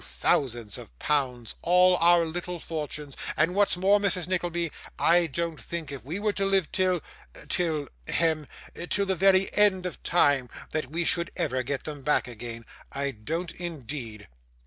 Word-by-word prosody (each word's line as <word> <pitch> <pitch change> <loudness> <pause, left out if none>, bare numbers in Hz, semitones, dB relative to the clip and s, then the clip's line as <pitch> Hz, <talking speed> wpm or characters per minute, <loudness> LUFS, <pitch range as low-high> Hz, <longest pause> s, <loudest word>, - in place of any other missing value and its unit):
thousands 120 -6 0
of - - -13
pounds, 125 - -1
all 180 +1 +5
our 170 0 +5
little 175 +2 -4
fortunes, 150 -3 -5 0.2
and 160 +5 +3
what's 200 -2 +3
more, 195 +3 +4
Mrs. 185 -4 +1
Nickleby, 175 -2 -1 0.3
I 170 0 +4
don't 165 +1 -3
think, 170 -3 -5
if 140 -3 -7
we 160 +9 -4
were 210 0 0
to 200 - -1
live 195 -4 +1
till 185 -3 +1 0.5
till 160 -5 0 0.2
hem 160 -3 +2 0.4
till 200 - +1
the 190 - +1
very 190 +1 +4
end 195 -3 +4
of 180 - -5
time, 145 -7 +3 0.2
that 155 -4 -2
we 170 +3 -1
should 170 +1 +1
ever 130 -3 0
get 135 +2 -3
them 150 -2 -6
back 150 -2 +1
again. 115 -1 -7 0.3
I 140 0 -1
don't 160 +10 -4
indeed. 135 -10 -7
165 Hz, 165 wpm, -27 LUFS, 140-180 Hz, 0.5 s, all